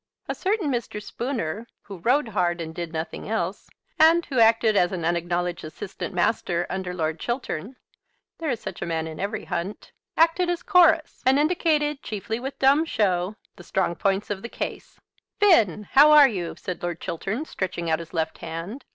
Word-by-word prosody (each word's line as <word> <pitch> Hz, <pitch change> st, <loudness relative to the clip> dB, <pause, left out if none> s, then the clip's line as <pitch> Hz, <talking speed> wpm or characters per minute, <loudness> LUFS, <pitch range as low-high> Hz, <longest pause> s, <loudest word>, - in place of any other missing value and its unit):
A -, -, -1 dB
certain 385 Hz, -6 st, -1 dB
Mr. 235 Hz, -4 st, -3 dB
Spooner, 230 Hz, -, -4 dB, 0.2 s
who 195 Hz, -3 st, -9 dB
rode 250 Hz, -, +2 dB
hard 175 Hz, -4 st, 0 dB
and 160 Hz, -1 st, -5 dB
did 170 Hz, -1 st, -5 dB
nothing 160 Hz, +4 st, -5 dB
else, 200 Hz, -4 st, -2 dB, 0.3 s
and 330 Hz, +2 st, +6 dB
who 265 Hz, -6 st, -1 dB
acted 225 Hz, -1 st, +5 dB
as 175 Hz, -3 st, +3 dB
an 175 Hz, -4 st, -3 dB
unacknowledged 175 Hz, +1 st, -1 dB
assistant 155 Hz, +6 st, -6 dB
master 175 Hz, -1 st, 0 dB
under 190 Hz, -1 st, -3 dB
Lord 160 Hz, -2 st, -2 dB
Chiltern, 240 Hz, -, -4 dB, 0.6 s
there 325 Hz, -2 st, -2 dB
is 240 Hz, -4 st, -1 dB
such -, -, -7 dB
a -, -, -3 dB
man 160 Hz, -1 st, -1 dB
in 160 Hz, -1 st, -7 dB
every 205 Hz, +2 st, -3 dB
hunt, 190 Hz, +5 st, -5 dB, 0.3 s
acted 335 Hz, +2 st, +3 dB
as 350 Hz, -1 st, -2 dB
chorus, 335 Hz, -4 st, +4 dB
and 260 Hz, +1 st, +4 dB
indicated, 300 Hz, -2 st, +1 dB
chiefly 220 Hz, +2 st, -4 dB
with 270 Hz, +2 st, -6 dB
dumb 275 Hz, +4 st, +4 dB
show, 195 Hz, -, 0 dB, 0.2 s
the -, -, -11 dB
strong 190 Hz, -2 st, 0 dB
points 195 Hz, +3 st, -1 dB
of 195 Hz, -2 st, -3 dB
the 235 Hz, -, -7 dB
case. -, -, -6 dB, 0.4 s
"Finn, 220 Hz, -, +4 dB
how 290 Hz, +3 st, +8 dB
are 300 Hz, -2 st, +9 dB
you?" 180 Hz, -8 st, -4 dB
said 180 Hz, -, -6 dB
Lord 175 Hz, -1 st, -3 dB
Chiltern, 195 Hz, -, -3 dB
stretching 185 Hz, -, -4 dB
out 160 Hz, 0 st, +1 dB
his 165 Hz, -1 st, -9 dB
left 160 Hz, -1 st, -2 dB
hand. 170 Hz, +11 st, -6 dB
205 Hz, 180 wpm, -25 LUFS, 175-275 Hz, 0.6 s, are